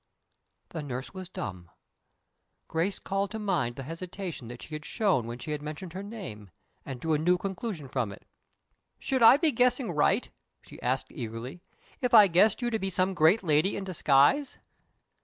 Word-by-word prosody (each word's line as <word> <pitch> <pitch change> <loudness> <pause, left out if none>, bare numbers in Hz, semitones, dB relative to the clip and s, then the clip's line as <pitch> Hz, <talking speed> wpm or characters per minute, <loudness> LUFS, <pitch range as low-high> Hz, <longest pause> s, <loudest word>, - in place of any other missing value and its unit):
The 160 - -5
nurse 130 -2 -6
was 185 -2 -8
dumb. 90 - -6 1.0
Grace 165 +5 -1
called 195 0 -2
to 220 - -5
mind 175 - -1
the 135 - -6
hesitation 170 - -6
that 120 +1 -9
she 155 - -10
had 150 0 -5
shown 185 - +1
when 120 +1 -5
she 125 +5 -6
had 150 -1 -3
mentioned 155 +3 -7
her 190 - -5
name, 190 - -8 0.3
and 130 -3 -7
drew 160 +3 0
a 150 - +2
new 180 +3 +3
conclusion 190 - -5
from 125 -6 -2
it. 100 - -12 0.7
"Should 260 -2 -1
I 230 +4 +9
be 315 0 +2
guessing 250 -2 +2
right," 150 -3 +2 0.4
she - - -13
asked, 130 +2 -1
eagerly, 120 +6 -6 0.4
"if 250 -2 +3
I 215 -2 +10
guessed 200 +6 +3
you 240 - 0
to 220 - 0
be 195 - -2
some 185 +1 +1
great 175 +5 +4
lady 155 +3 +2
in 200 - -4
disguise?" 180 - +3
175 Hz, 180 wpm, -28 LUFS, 135-200 Hz, 1.0 s, I